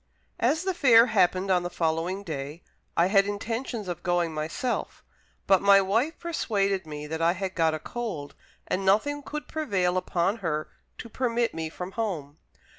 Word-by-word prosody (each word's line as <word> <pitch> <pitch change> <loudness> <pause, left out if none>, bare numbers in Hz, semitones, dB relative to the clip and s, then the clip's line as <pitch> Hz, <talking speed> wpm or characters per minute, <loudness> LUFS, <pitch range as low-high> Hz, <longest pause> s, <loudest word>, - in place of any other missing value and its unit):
As 295 +8 +2
the 380 0 0
fair 240 -8 +6
happened 185 -1 +3
on 180 -1 +3
the 175 - -3
following 170 +4 -1
day, 150 -1 -6 0.3
I 170 - +5
had 195 +1 +4
intentions 225 +1 -3
of 175 -1 -4
going 175 -2 0
myself; 155 +11 -3 0.4
but 195 -2 +4
my 200 0 +7
wife 225 - +1
persuaded 200 - -1
me 150 -1 -6
that 160 +2 -4
I 165 +1 +4
had 190 0 -4
got 160 -3 +2
a - - -5
cold, 185 -8 -5 0.3
and 195 - -1
nothing 220 +10 +2
could 300 +1 -6
prevail 190 - 0
upon 185 +3 0
her 155 -7 -2 0.3
to - - -8
permit 235 0 0
me 160 -1 -4
from 180 +3 -7
home. 165 -10 -4
190 Hz, 170 wpm, -27 LUFS, 170-230 Hz, 0.4 s, my